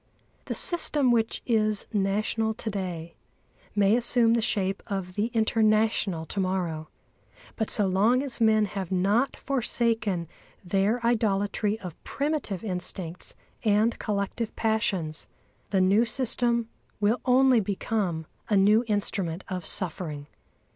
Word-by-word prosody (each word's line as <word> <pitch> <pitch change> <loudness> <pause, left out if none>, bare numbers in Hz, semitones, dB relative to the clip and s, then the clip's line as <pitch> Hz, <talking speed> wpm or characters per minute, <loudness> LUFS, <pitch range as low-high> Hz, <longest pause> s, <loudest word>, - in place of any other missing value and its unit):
The - - -3
system 300 -7 +3
which 225 -2 0
is 215 -3 +2
national 215 +2 0
to 220 0 -4
day 175 -4 -5 0.6
may 205 +1 +4
assume 235 -1 +3
the 230 - +2
shape 195 -3 -1
of 190 -2 -4
the 210 +4 0
international 215 -6 +1
to 200 - -5
morrow; 175 -5 -2 0.7
but 220 - -2
so 205 - +3
long 210 +8 +3
as 260 -4 -4
men 215 -1 +4
have 195 -3 -5
not 200 +8 +2
forsaken 225 -8 0 0.4
their 200 +6 +1
idolatry 210 -2 +1
of 180 -4 -9
primitive 280 - -2
instincts 180 -3 -4 0.3
and 215 +1 +2
collective 210 +2 -3
passions, 195 -8 -1 0.4
the 190 -2 +2
new 195 +5 +4
system 235 -1 0 0.3
will 215 +4 +1
only 255 -1 +5
become 195 -4 -2 0.2
a 210 - +3
new 210 +4 +5
instrument 195 -4 -1
of 185 -3 -4
suffering. 155 -5 -1
210 Hz, 125 wpm, -27 LUFS, 190-230 Hz, 0.7 s, only